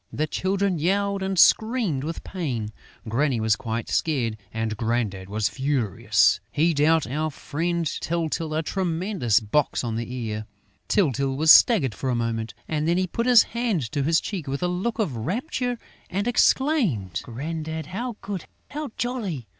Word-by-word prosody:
The 155 - -1
children 190 +2 0
yelled 200 +4 +1
and 190 0 -2
screamed 220 - +3
with 165 +2 -5
pain. 130 - -3 0.4
Granny 125 +2 +1
was 110 -1 +2
quite 115 0 -4
scared; 125 -9 0 0.2
and 110 -1 -2
Grandad 110 -4 -2
was 105 0 0
furious. 130 -7 +2
He 165 +9 +2
dealt 155 +2 +3
our 155 +5 -2
friend 170 +4 -2
Tyltyl 160 0 -2
a 160 - 0
tremendous 175 - 0
box 120 +8 0
on 115 -2 -2
the 115 +1 -4
ear. 110 -4 -4 0.4
Tyltyl 140 - +1
was 160 +2 +6
staggered 160 - +6
for 130 +7 -3
a 125 - +1
moment; 115 -1 -2
and 155 0 -1
then 170 +1 +2
he 185 - +2
put 230 +7 -2
his 245 -3 +8
hand 225 - -2
to 145 -2 -1
his 160 +4 +3
cheek 180 -8 -5
with 140 +4 -3
a - - +2
look 185 +7 -2
of 200 - -1
rapture 245 - -2 0.3
and 200 +4 -2
exclaimed: 235 - +2
"Grandad, 160 +5 -5
how 230 - -5
good, 195 -4 -5 0.3
how 300 -1 -4
jolly! 215 - -3
155 Hz, 160 wpm, -24 LUFS, 120-190 Hz, 0.4 s, his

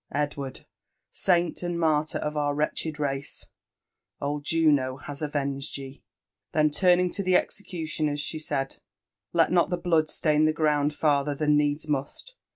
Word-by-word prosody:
Edward! 145 -2 -3 0.5
saint 175 -3 +1
and 175 -1 -2
martyr 155 -2 +1
of 150 0 -3
our 145 -1 0
wretched 150 +1 -2
race 140 -1 -3 0.7
1— - - -4
old 145 0 -3
Jiino 145 -5 +2
has 145 0 -7
avenged 140 -1 -2
ye 135 0 -9 0.3
!" 105 0 -63
Then 155 -1 +3
turning 180 +2 +3
to - - -3
the 185 -1 +2
execuHoners, 160 -7 -1
she 155 +2 -4
said, 140 -3 -3 0.3
" - - -64
Let 165 -2 +3
not 175 -1 +3
the 180 - 0
blood 165 -3 +2
stain 155 -1 +2
the 155 - +3
ground 150 -2 +1
farther 145 -1 +1
than 150 +1 +2
needs 145 +1 +1
must. 150 - -3
150 Hz, 160 wpm, -27 LUFS, 145-160 Hz, 0.7 s, Then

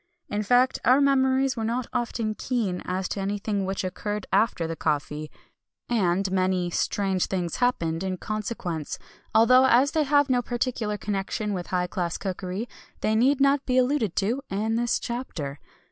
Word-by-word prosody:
In 205 - -1
fact, 245 +5 +3
our 255 +3 +5
memories 265 -1 +3
were 225 - -3
not 235 +3 -1
often 235 -3 -1
keen 215 -6 -2
as 185 0 -2
to - - -3
anything 200 0 -1
which 195 +1 -2
occurred 205 +2 -3
after 200 -6 +2
the 165 0 -3
coffee, 150 0 -2 0.6
and 195 -4 +1
many 185 -2 +1
"strange 190 0 0
things 175 -3 -2
happened" 170 -9 0
in 185 -1 -2
consequence; 195 -7 -4 0.4
although 255 +4 +6
as 265 +4 +4
they 315 - +1
have 290 -1 +3
no 250 -2 +2
particular 235 -3 -2
connection 205 +1 -2
with 180 -2 -4
high 180 -1 0
class 175 -2 -2
cookery, 190 +3 -4 0.3
they 215 - +1
need 260 +5 +3
not 275 0 +3
be 255 -1 +2
alluded 250 - +2
to 225 +8 0
in 215 +3 -1
this 240 +1 +1
chapter. 165 - -5
210 Hz, 160 wpm, -26 LUFS, 185-250 Hz, 0.6 s, although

